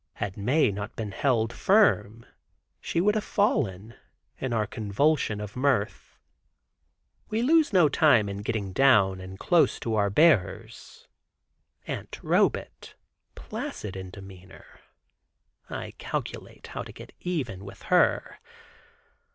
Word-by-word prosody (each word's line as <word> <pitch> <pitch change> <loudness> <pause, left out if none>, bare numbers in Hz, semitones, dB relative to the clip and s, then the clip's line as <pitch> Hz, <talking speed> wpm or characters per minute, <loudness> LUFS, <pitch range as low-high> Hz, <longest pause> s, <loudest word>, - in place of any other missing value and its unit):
Had 95 - -4
not 100 - -8
Mae 140 -2 +3 0.2
been 110 -3 -5
held 115 0 0
firm, 115 - +2 0.5
she - - -2
would 205 +4 +3
have 215 -1 -1
fallen, 115 - 0 0.5
in 130 - -3
her 110 -2 +1
convulsion 110 +3 0
of 105 -1 -7
mirth. 125 -5 -1 1.1
We 220 +2 -1
lose 315 +3 +4
no 180 -6 +5
time 135 -7 +4
in 100 0 -5
getting 105 -3 -3
down, 100 -9 +4
and 95 +1 -9
close 170 - +2
to 115 - -2
our 100 -2 +2
bearers. 150 - +1 0.8
Aunt - - -6
Robet, - - 0 0.4
placid 100 -3 -6
in 95 -1 -7
demeanor, 95 -1 -14 0.9
I - - -6
calculate - - -6
how - - -6
to - - -9
get - - -13
even 130 - -4
with 100 0 -11
her. - - +2
110 Hz, 125 wpm, -26 LUFS, 100-155 Hz, 1.1 s, no